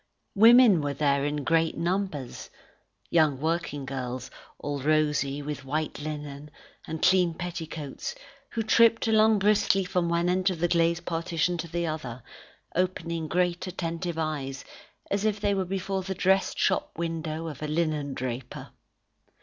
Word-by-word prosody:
Women 225 -3 +7
were 145 -1 -2
there 140 -1 +2
in 145 0 -2
great 165 +2 +2
numbers: 170 -7 -2 0.6
young 155 -5 +3
work 165 +3 0 0.2
girls, 130 -1 -5 0.3
all 145 -1 -4
rosy, 150 -1 +1
with 145 -2 -5
white 150 +3 -3
linen, 150 -1 -6 0.4
and 160 0 -5
clean 180 -2 +4
petticoats, 160 -5 -5 0.3
who 225 - -2
tripped 230 +1 +4
along 220 0 +5
briskly 200 -1 +3
from 180 -1 0
one 170 +1 +1
end 185 +1 +2
of 185 - -3
the 175 - +2
glazed 170 0 +1
partition 170 +1 0
to 170 - -3
the 170 +1 -2
other, 130 -7 -5 0.5
opening 170 -3 -1
great 175 +2 0
attentive 170 -1 -3
eyes, 140 -4 -3 0.5
as 200 0 0
if 215 -1 +1
they 205 0 +1
were 190 -1 0
before 190 +1 -2
the 190 +1 -4
dressed 190 +1 +2
shop - - 0
window 165 -1 -3
of 150 -4 -7
a 155 - -2
linendraper. 140 -6 -3
165 Hz, 145 wpm, -27 LUFS, 150-185 Hz, 0.6 s, Women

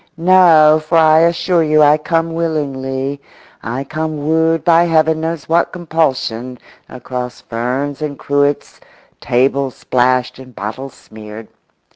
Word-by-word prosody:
No, 165 -3 +5
for 165 +2 0
I 160 -1 +5
assure 170 +1 +1
you 155 -1 +3
I 150 +1 +4
come 165 +1 -1
willingly; 140 -4 -3 0.4
I 120 +4 -4
come 155 0 -5
wooed 160 0 +1
by 170 0 +4
Heaven 160 -1 +1
knows 165 -2 -4
what 170 +1 +1
compulsion 135 -8 -2 0.3
across 125 -1 -7
ferns 130 +5 -4
and 145 -2 -4
cruets, 145 0 -1 0.4
table 135 +2 0
splashed 125 0 -1
and 130 -2 -14
bottles 115 +6 -7
smeared. 110 0 -12
150 Hz, 125 wpm, -16 LUFS, 130-160 Hz, 0.4 s, No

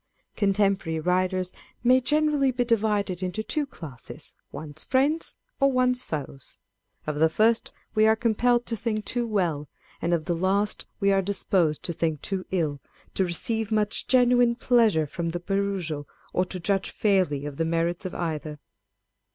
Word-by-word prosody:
Contemporary 195 -5 +1
writers 185 +2 0 0.3
may 255 +1 +5
generally 295 0 +2
be 250 -1 0
divided 210 -5 +1
into 185 +4 -2
two 295 +4 -2
classes 145 - -10 0.2
â€" - - -41
one's 155 0 -7
friends 285 +5 +1 0.2
or 275 0 +4
one's 250 -1 +2
foes. 140 - -6 0.5
Of 150 -1 -3
the 160 +1 +4
first 225 +7 +2 0.2
we 215 0 +4
are 220 - +5
compelled 240 +2 +2
to 230 - -3
think 215 -1 -2
too 240 -1 -1
well, 170 -9 -1 0.3
and 170 - 0
of 165 -2 +1
the 175 - 0
last 195 +4 0
we 200 -1 +3
are 195 0 +3
disposed 185 -5 0
to 170 - -2
think 160 -3 -2
too 190 -2 -3
ill, 155 -6 -1 0.3
to 190 - +1
receive 220 +5 -2
much 210 -1 +1
genuine 245 -2 +4
pleasure 225 -9 +3
from 170 +3 -4
the 175 +1 -3
perusal, 185 -6 -2 0.3
or 185 - +2
to 185 0 -6
judge 195 +2 0
fairly 185 -9 +1
of 145 -1 -6
the 165 - +1
merits 165 +2 0
of 185 - -5
either. 155 -3 -3
195 Hz, 165 wpm, -26 LUFS, 165-230 Hz, 0.5 s, may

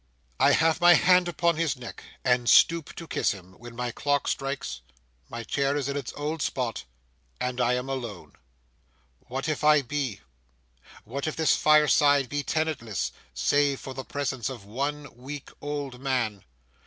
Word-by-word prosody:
I - - +5
have 160 0 +3
my 175 0 +8
hand 180 +2 +4
upon 170 -1 +1
his 160 -5 0
neck, 120 -2 -9 0.2
and 125 -1 +3
stoop 165 -2 +4
to 165 - -8
kiss - - +1
him, 95 -2 -13
when 120 0 -11
my 120 0 -3
clock 145 +3 0
strikes, 135 - -3 0.5
my 115 0 -6
chair 140 +4 0
is 140 -2 -2
in 140 - -2
its 140 -4 -4
old 150 +2 -3
spot, 120 - -2 0.5
and 125 0 -2
I 120 0 +3
am 125 +1 -3
alone. 120 -8 -6 0.9
What 135 +4 -3
if 155 -1 -2
I 150 -1 +5
be? 135 - -3 0.8
What 140 +7 -4
if 155 - -2
this 160 -1 +3
fireside 145 -3 +4
be 145 0 -1
tenantless, 140 - -2 0.2
save 140 - +2
for 130 - -7
the 130 0 -6
presence 130 -4 -3
of 120 -7 -8
one 145 +7 -3
weak 135 +3 -8
old 145 -4 -5
man? 120 -7 -1
135 Hz, 165 wpm, -27 LUFS, 125-150 Hz, 0.9 s, my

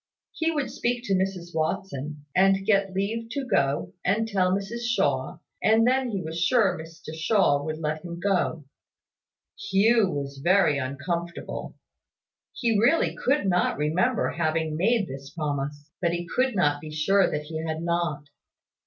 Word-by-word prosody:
He 325 0 -1
would 295 -5 -2
speak 240 0 -1
to 200 - -1
Mrs 185 -2 -1
Watson, 150 -2 -3
and 195 +1 +4
get 195 -2 +2
leave 215 +4 -2
to 280 -2 -2
go 140 - 0
and 215 +4 +1
tell 190 -4 +1
Mrs 200 +5 -2
Shaw, 240 +1 0 0.2
and 220 +1 +4
then 255 0 +2
he 195 -5 -3
was 160 +1 -4
sure 200 -2 +3
Mr 160 -1 -10
Shaw 160 -3 +2
would 155 +1 -3
let 155 0 -3
him 170 -1 -7
go. 175 -5 0 1.0
Hugh 220 +1 +4
was 140 -3 -4
very 180 -5 +4
uncomfortable. 170 +6 -4 0.8
He 230 -4 +1
really 260 +10 +3
could 275 -2 +1
not 180 -2 +1
remember 175 - +1
having 160 -1 -1
made 205 +4 +2
this 135 +1 -8
promise: 145 -1 -4
but 170 -1 +1
he 175 0 -3
could 255 -2 +2
not 145 -5 +2
be 155 - -8
sure 180 +6 +2
that 150 0 -3
he 160 +1 -5
had 160 0 -3
not. 170 -4 -1
175 Hz, 155 wpm, -26 LUFS, 155-210 Hz, 1.0 s, and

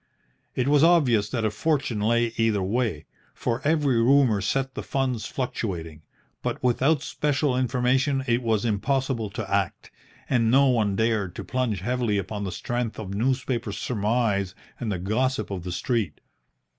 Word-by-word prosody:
It 130 0 0
was 145 +1 +4
obvious 130 -12 +4
that 115 -2 -1
a 110 - +1
fortune 135 -3 0
lay 115 +2 +1
either 110 -4 +1
way, 105 -6 -1 0.3
for 120 0 -2
every 145 -6 +2
rumour 125 -4 +4
set 135 +6 -1
the - - -4
funds 130 -5 -2
fluctuating; 85 - -4 0.4
but - - -2
without 135 +4 +2
special 145 -2 0
information 130 +2 +1
it 120 -1 +1
was 115 -2 0
impossible 120 +1 0
to 110 0 -5
act, 100 -1 -1 0.4
and 115 -3 +2
no 135 +3 +5
one 110 -5 +2
dared 110 -4 0
to - - -5
plunge 125 -7 -1
heavily 120 -1 0
upon 100 +1 -3
the 95 - -3
strength 120 0 -3
of 100 -3 -6
newspaper 125 0 -1
surmise 105 -3 0 0.2
and 115 -3 -2
the 95 - -1
gossip 110 +4 -1
of 95 -3 -4
the 90 - -5
street. 115 +4 -1
120 Hz, 155 wpm, -25 LUFS, 105-130 Hz, 0.4 s, no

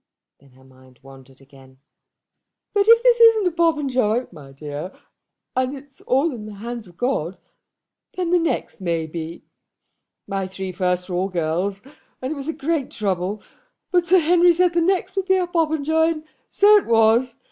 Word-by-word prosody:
Then 140 - -22
her 130 +1 -21
mind 130 -1 -21
wandered 135 0 -16
again. 135 -1 -19 1.0
"But 405 0 +2
if 460 +1 +6
this 485 -1 +4
isn't 455 -3 +6
a 360 - +2
Popenjoy, 270 -9 +1
my 140 -3 -13
dear, 145 +5 -8 0.6
and 255 +2 -1
it's 275 0 -16
all 275 +6 +2
in 215 -3 -8
the 210 - -9
hands 230 +1 -7
of 175 -1 -18
God, 195 - -2 0.8
then 360 -2 -2
the 355 - +4
next 330 - -3
may 170 -3 -1
be. 165 +1 -7 0.8
My 195 -2 -3
three 190 0 -6
first 180 0 -1
were 180 - -4
all 185 +2 -1
girls; 180 +3 -2 0.4
and 260 +4 -3
it - - -8
was 280 0 -7
a - - 0
great 310 -2 -2
trouble; 195 0 -3 0.5
but 355 -1 +2
Sir 370 +3 +5
Henry 350 +1 +4
said 355 +1 +2
the 340 - +2
next 380 +2 0
would 385 -1 -1
be 380 -1 +3
a 365 - 0
Popenjoy; 320 -1 +1
and 310 -1 -10 0.3
so 420 +1 +6
it 410 - -1
was. 230 +2 +3
240 Hz, 180 wpm, -21 LUFS, -, 1.0 s, if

